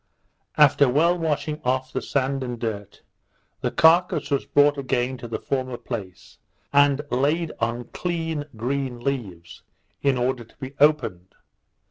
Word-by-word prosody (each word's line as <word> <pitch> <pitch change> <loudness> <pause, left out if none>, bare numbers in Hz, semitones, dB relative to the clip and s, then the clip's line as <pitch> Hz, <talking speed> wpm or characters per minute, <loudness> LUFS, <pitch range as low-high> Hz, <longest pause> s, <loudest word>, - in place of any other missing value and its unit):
After 140 -3 +6
well 165 +7 +3
washing 155 -2 -2
off 130 +1 -1
the - - -1
sand 135 0 -1
and 125 -1 -4
dirt, 105 -3 -5 0.6
the - - 0
carcase 170 0 +3
was 140 - 0
brought 145 0 +4
again 130 -1 -1
to 120 - -7
the 115 - -3
former 130 -2 -3
place, 100 -9 -8 0.3
and 145 0 +4
laid 150 +6 +1
on 115 +1 -1
clean 165 -4 -2
green 125 +2 -2
leaves, 100 -11 -4 0.4
in 140 -2 +2
order 125 0 -1
to 115 - -24
be 130 +1 -7
opened. 125 - +2
130 Hz, 140 wpm, -24 LUFS, 120-145 Hz, 0.6 s, After